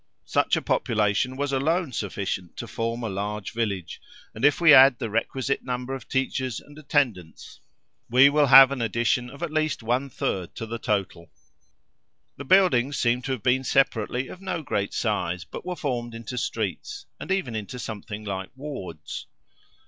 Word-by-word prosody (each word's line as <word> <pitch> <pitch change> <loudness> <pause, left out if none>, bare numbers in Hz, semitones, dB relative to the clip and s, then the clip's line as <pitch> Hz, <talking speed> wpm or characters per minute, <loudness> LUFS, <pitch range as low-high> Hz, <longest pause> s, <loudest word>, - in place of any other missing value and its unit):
Such - - +2
a - - -2
population 110 +4 0
was 140 0 -2
alone 160 +4 +1
sufficient 95 -4 -4
to - - -5
form 115 +1 -3
a - - -1
large 105 0 -4
village; 100 -7 -3 0.3
and 110 - -8
if 145 -1 +4
we 170 -3 +7
add 130 -1 +8
the 110 - -4
requisite 130 +5 -1
number 125 +1 -4
of 130 -3 -7
teachers 130 -3 -1
and 145 - -16
attendants, 125 - -2 0.5
we 130 +4 +7
will 145 0 +3
have 135 0 +9
an 135 -3 -3
addition 120 +2 0
of 140 +6 -9
at 170 - -3
least 155 -5 -1
one 125 +4 0
third 95 -7 -3
to 115 - -5
the 115 +1 -5
total. 95 -6 -2 1.1
The 140 - -7
buildings 140 -6 +4
seem 120 +1 +1
to 130 - -2
have 120 -6 -6
been 130 +1 +2
separately 125 -1 +1
of 185 - -11
no 175 -4 -3
great 100 -7 -2
size, 90 -6 -1
but - - -9
were 180 - -2
formed 120 -7 -3
into 115 +2 -7
streets, 120 - -4
and - - -6
even 165 -12 -1
into 110 +3 -5
something 110 -2 -7
like 95 -1 -4
wards. 130 - -7
125 Hz, 170 wpm, -25 LUFS, 105-140 Hz, 1.1 s, have